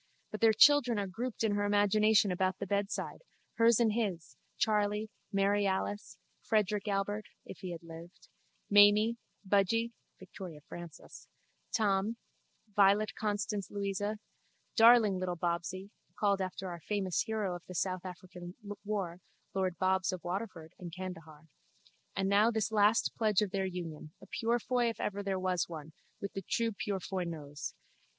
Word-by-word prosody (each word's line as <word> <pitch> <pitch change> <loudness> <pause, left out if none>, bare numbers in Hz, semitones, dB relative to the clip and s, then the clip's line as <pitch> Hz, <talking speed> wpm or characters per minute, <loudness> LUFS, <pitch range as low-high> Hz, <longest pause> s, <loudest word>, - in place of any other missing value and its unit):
But 215 - -6
their 225 -1 +7
children 245 +1 +6
are 200 - 0
grouped 225 +6 -4
in 220 - +2
her 205 0 +1
imagination 205 0 +4
about 185 +1 0
the 200 - -4
bedside, 200 +1 -2 0.4
hers 230 0 +5
and 225 -3 +3
his, 200 -8 -2 0.2
Charley, 210 0 +1 0.2
Mary 200 0 +2
Alice, 195 +2 -2 0.2
Frederick 210 -1 0
Albert 205 +1 -1 0.2
(if 170 - -10
he 185 - -6
had 170 0 -7
lived), 165 +1 -12 0.4
Mamy, 205 +3 +6 0.3
Budgy 210 +4 +2 0.3
(Victoria 175 -6 -9
Frances), 175 -3 -10 0.4
Tom, 210 0 +1 0.6
Violet 205 +1 +4
Constance 205 -1 -2
Louisa, 205 +1 -2 0.6
darling 225 -4 +6
little 180 -1 -2
Bobsy 175 +3 -2 0.3
(called 200 -2 +2
after 185 0 -4
our 170 -2 -6
famous 195 -3 0
hero 215 -4 -1
of 175 - -8
the 185 - -8
South 185 +1 -1
African 180 0 -9 0.3
war, 195 -5 -3 0.3
lord 185 -2 -1
Bobs 190 0 +2
of 185 -2 -6
Waterford 175 -3 -5
and 175 -2 -7
Candahar) 165 -4 -8 0.7
and 195 0 0
now 205 +3 +5
this 220 -1 -1
last 210 +1 +3
pledge 215 -3 +2
of 200 - -3
their 195 -1 0
union, 165 -4 -6
a - - -13
Purefoy 240 +1 0
if 230 - -6
ever 205 0 -2
there 195 -1 -1
was 185 0 0
one, 160 -2 -8 0.3
with 200 - -5
the 195 - -4
true 230 +5 0
Purefoy 195 -2 -3
nose. 150 -4 -6
200 Hz, 150 wpm, -32 LUFS, 180-215 Hz, 0.7 s, their